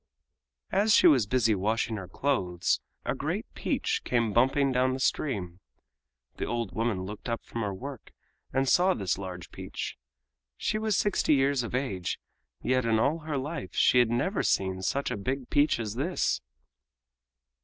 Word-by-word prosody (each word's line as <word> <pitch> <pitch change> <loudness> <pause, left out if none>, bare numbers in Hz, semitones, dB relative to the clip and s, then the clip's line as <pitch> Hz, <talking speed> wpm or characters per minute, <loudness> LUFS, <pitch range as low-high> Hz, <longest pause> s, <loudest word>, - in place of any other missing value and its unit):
As 210 +2 +4
she - - +5
was 125 -9 +6
busy 115 -1 +3
washing 110 +3 0
her 95 -2 -7
clothes 90 -12 0 0.3
a - - 0
great - - -2
peach - - -1
came 115 -4 +1
bumping 135 +4 +3
down 130 0 +2
the - - -5
stream. 100 - -1 0.8
The - - -2
old 120 -4 -2
woman 110 -4 -1
looked 105 +5 -7
up 115 - -3
from 115 - -5
her 105 -2 -1
work 130 +6 -8 0.4
and 135 +1 +1
saw 180 +6 +4
this 95 -2 -1
large 90 -2 -7
peach. - - -6 0.6
She 215 - -1
was 215 -3 +1
sixty 200 -6 +2
years 135 -1 +2
of 120 +1 -4
age, 100 -10 -2 0.4
yet 130 0 +2
in 115 -1 +2
all 140 +9 +2
her 155 -2 -3
life 145 +2 -5
she 125 - +5
had 120 -2 +4
never 120 - 0
seen 95 -1 0
such 140 +9 -1
a - - -2
big 130 +5 -3
peach 145 -3 +3
as 110 -3 -3
this. 150 +10 0
125 Hz, 165 wpm, -28 LUFS, 105-140 Hz, 0.8 s, was